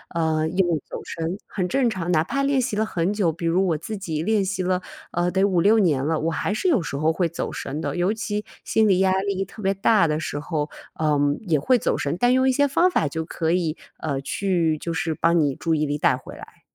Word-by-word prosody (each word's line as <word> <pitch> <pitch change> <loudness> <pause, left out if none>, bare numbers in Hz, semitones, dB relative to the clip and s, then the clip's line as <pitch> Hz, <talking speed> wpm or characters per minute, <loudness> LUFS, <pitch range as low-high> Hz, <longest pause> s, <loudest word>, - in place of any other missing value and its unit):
呃， 160 -1 +1
因 180 +3 +1
为 165 -4 0
走 - - -7
神 165 +3 -4
很 185 -3 -3
正 245 +6 +2
常， 180 -5 -4
哪 155 -1 +3
怕 275 +11 -2
练 275 -2 +2
习 240 -4 -2
了 220 - +2
很 180 -2 -1
久， 190 -6 +1
比 170 +1 -6
如 180 +3 +2
我 160 -3 +1
自 215 +7 -6
己 160 -5 -3
练 210 +1 +1
习 190 -1 -2
了， 185 0 0 0.3
呃， 175 +1 0
得 190 +2 +1
五 190 -4 +2
六 210 +6 +5
年 145 -9 +2
了， 160 +1 +1
我 165 +1 0
还 195 +5 -1
是 365 - 0
有 260 - +3
时 150 - -5
候 155 +3 +2
会 170 +1 0
走 - - -4
神 150 +4 -5
的， - - -3
尤 180 +4 +2
其 215 -2 -3 0.2
心 220 -1 +2
理 190 -2 +3
压 190 -1 +3
力 195 -1 -1
特 205 +3 -11
别 195 0 +1
大 195 -2 +3
的 155 0 -1
时 145 - -3
候， 150 0 -3 0.3
嗯， 145 -1 +2
也 165 -8 +1
会 250 - +3
走 - - 0
神。 145 +3 -1
但 245 +5 +3
用 260 0 +3
一 260 - +3
些 285 +2 +3
方 345 +7 +3
法 160 - +1
就 160 +2 -4
可 160 -1 -2
以， 170 -3 0 0.2
呃， 140 -4 -2
去 170 -1 0
就 170 +2 -4
是 160 0 -1
帮 170 +2 +2
你 145 -4 +2
注 165 -1 0
意 155 0 +1
力 145 0 -2
带 - - +3
回 - - -10
来。 - - -14
175 Hz, 275 characters per minute, -23 LUFS, 160-205 Hz, 0.3 s, 六